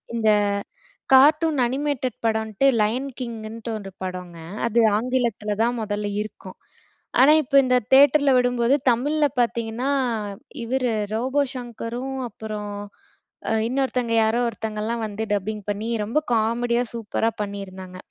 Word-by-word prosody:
இந்த 220 -2 +2 0.8
cartoon 300 +3 +5
animated 265 -1 -2
படம்ன்ட்டு 220 +1 0 0.2
line 250 +6 0
கிங்குன்ட்டு 225 -1 -6
ஒன்று 195 -2 -8
படங்க. 180 -2 -6 0.3
அது 235 +1 +2 0.2
ஆங்கிலத்துல 235 -3 -1
தான் 240 +1 0
மொதல்ல 205 -1 -2 0.2
இருக்கும். 195 -3 -11 0.7
ஆனா, 275 +4 +8
இப்ப 275 - -10
இந்த 255 0 +3 0.2
தியேட்டர்ல 285 +1 +6
விடும்போது 245 +1 +2 0.2
தமிழ்ல 290 +6 +1 0.2
பார்த்தீங்கன்னா, 235 +1 -1 0.8
இவரு 250 +1 0 0.2
ரோபோ 260 +5 +1
ஷங்கரும், 245 +1 -5
அப்பறம் 210 -1 -6 0.8
அ - - +2 0.2
இன்னொருத்தங்க 250 -2 -1
யாரோ 220 +2 +2
ஒருத்தங்கலாம் 220 +1 -3
வந்து 210 +1 -5
டப்பிங் 205 +1 -2
பண்ணி 205 +2 -3 0.2
ரொம்ப 230 +8 0 0.2
காமெடியா, 235 +2 +1
சூப்பரா 225 0 -1
பண்ணியிருந்தாங்க. 190 -2 -7
230 Hz, 115 wpm, -23 LUFS, 215-255 Hz, 0.8 s, ஆனா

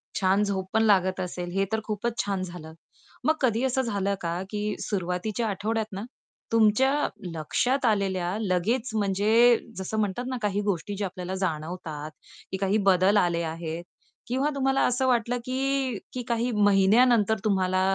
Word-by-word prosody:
छान 195 +1 +2
झोप 190 -2 -2
पण 220 - +3
लागत 190 -3 +3
असेल, 180 -1 -4
हे 195 +1 +1
तर 220 - +1
खूपच 225 +2 -3
छान 195 -2 -1
झालं. 170 -3 -8 0.5
मग 315 - +4
कधी 240 -2 +2
असं 265 0 +1
झालं 200 -4 -1
का, 170 +1 -2
की 210 0 -2
सुरुवातीच्या 195 +4 -2
आठवड्यात 215 +3 -1
ना, 195 +2 -4 0.5
तुमच्या 225 +4 +4 0.4
लक्ष्यात 250 - 0
आलेल्या 195 -3 0
लगेच 220 +6 0
म्हणजे 215 +4 +4 0.2
जसं 190 +3 -4
म्हणतात 210 +4 -1
ना, 255 -1 -2
काही 205 -1 0
गोष्टी 200 0 -2
ज्या 200 -1 -1
आपल्याला 185 0 -5
जाणवतात, 155 -3 -4 0.4
की 190 - -2
काही 195 +2 +1
बदल 190 +2 +4
आले 170 -3 +2
आहेत. 165 +1 -4 0.4
किंवा 265 +4 0
तुम्हाला 270 0 +1
असं 250 +1 +1
वाटलं, 245 0 +1
की 260 -2 -2
काही 235 +1 0
महिन्यानंतर 210 +2 +4
तुम्हाला 185 -2 +2
205 Hz, 150 wpm, -26 LUFS, 185-235 Hz, 0.5 s, मग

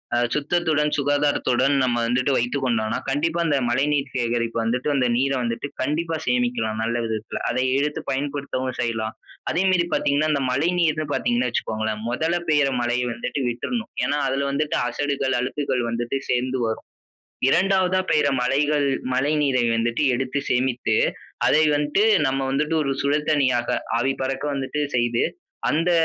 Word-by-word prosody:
அ - - +2 0.2
சுத்தத்துடன் 150 0 +1
சுகாதாரத்துடன் 145 -2 +2
நம்ம 125 -2 +1
வந்துட்டு 125 +3 +1
வைத்துக் 125 +4 -1
கொண்டோன்னா, 110 -3 0
கண்டிப்பா 160 +5 0
அந்த 145 -3 +2
மழைநீர் 140 +2 +1
சேகரிப்பு 115 -2 -1
வந்துட்டு, 125 +5 -1
அந்த 130 -2 +2
நீர 135 +2 +1
வந்துட்டு 115 +4 -2
கண்டிப்பா 160 +5 -1
சேமிக்கலாம் 120 -3 0
நல்ல 115 +1 -1
விதத்துல. 110 -1 -4
அதை 125 +2 0 0.2
எடுத்து 150 +1 -1
பயன்படுத்தவும் 140 -2 -3
செய்யலாம். 110 -2 -2 0.4
அதே 175 +4 +1
மேரி 180 -2 +3
பார்த்தீங்கன்னா 145 +2 +1
அந்த 140 -2 +1
மழைநீர் 160 +2 +1
பார்த்தீங்கன்னா 240 +1 +1
வச்சுக்கோங்களேன், 110 -1 -2
முதல்ல 160 +8 0
பெய்ற 145 -3 +3
மழையை 120 +1 0
வந்துட்டு 125 +4 -3
விட்றணும். 225 - -4
ஏனா, 145 +4 0
அதில 135 +1 0
வந்துட்டு 150 +2 0
அசடுகள், 140 -1 -1
அழுக்குகள் 130 0 -1
வந்துட்டு 120 +3 -2
சேர்ந்து 125 +1 0
வரும். 110 - -4 0.6
2 185 +2 +3
பெய்ற 150 - +3
மழைகள் 145 +3 +2 0.3
மழைநீரை 135 -2 +2
வந்துட்டு 115 +3 0
எடுத்து 130 +2 -2
சேமித்து, 125 -3 +1 0.5
அதை 155 - +4
வந்துட்டு 150 +7 +1 0.2
நம்ம 135 +1 0
வந்துட்டு 150 +3 0
ஒரு 140 - -1
சுழல் 150 +2 0
தண்ணீயாக 130 -5 +2 0.2
ஆவி 135 +3 +1
பறக்க 135 +1 -2
வந்துட்டு 135 +2 -3 0.2
செய்து 120 -1 +1 0.5
அந்த 165 +3 +1
135 Hz, 145 wpm, -23 LUFS, 120-150 Hz, 0.6 s, அதை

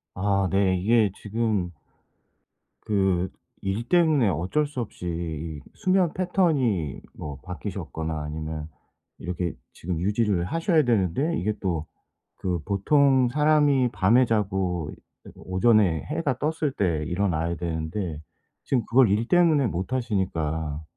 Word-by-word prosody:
아 100 0 +1
네. 95 -1 +2
이게 105 +2 +3
지금 105 -4 -1 1.1
그 95 -3 +1 0.3
일 100 +5 -2
때문에 160 - +4
어쩔 95 - 0
수 145 -3 -5
없이 100 -5 -6
이 80 -3 -4
수면 185 -3 +2
패턴이 145 - +1
뭐 70 -3 -7
바뀌셨거나 80 -4 -5
아니면 75 0 -5 0.5
이렇게 90 -1 -3 0.2
지금 85 -1 -4
유지를 100 -2 +1
하셔야 165 - +2
되는데 120 - +1
이게 105 +2 -1
또 85 -5 -2 0.6
그 90 -2 0
보통 130 +6 +3
사람이 145 -2 +3
밤에 120 +7 +4
자고 95 -7 -1 0.5
오전에 95 -3 +2
해가 150 -5 -2
떴을 155 -1 0
때 85 -6 0
일어나야 85 -2 0
되는데 80 0 -3 0.4
지금 125 -4 0
그걸 125 -3 +5
일 110 +4 +1
때문에 165 -7 +4
못 95 +5 -3
하시니까. 80 - -2
100 Hz, 245 characters per minute, -25 LUFS, 85-130 Hz, 1.1 s, 그걸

